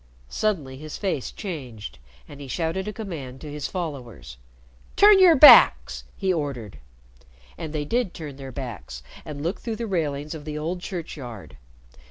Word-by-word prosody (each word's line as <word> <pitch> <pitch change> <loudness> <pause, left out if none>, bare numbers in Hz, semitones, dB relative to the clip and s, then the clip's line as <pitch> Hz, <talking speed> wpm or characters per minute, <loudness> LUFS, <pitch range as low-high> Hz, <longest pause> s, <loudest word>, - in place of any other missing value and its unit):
Suddenly 155 -12 -2
his 155 +2 -8
face 185 -10 -2
changed, 130 - -7 0.3
and 145 0 -12
he 140 - -8
shouted 165 +7 -2
a - - -2
command 160 - -7
to 150 - -8
his 150 -1 -4
followers. 120 - -6 0.6
"Turn 410 -1 +7
your 360 -3 +7
backs!" 295 +2 +7
he 190 -2 0
ordered. 130 - -4 0.8
And 160 -2 -6
they 150 -1 -3
did 235 +1 -1
turn 150 -5 -8
their 135 -1 -8
backs 115 - -7 0.2
and 145 -2 -7
looked 175 +4 -2
through 230 -2 -4
the 235 - -4
railings 155 -6 -2
of 155 -2 -8
the 150 0 -5
old 170 +4 -3
churchyard. 135 - -7
150 Hz, 160 wpm, -24 LUFS, 135-185 Hz, 0.8 s, Turn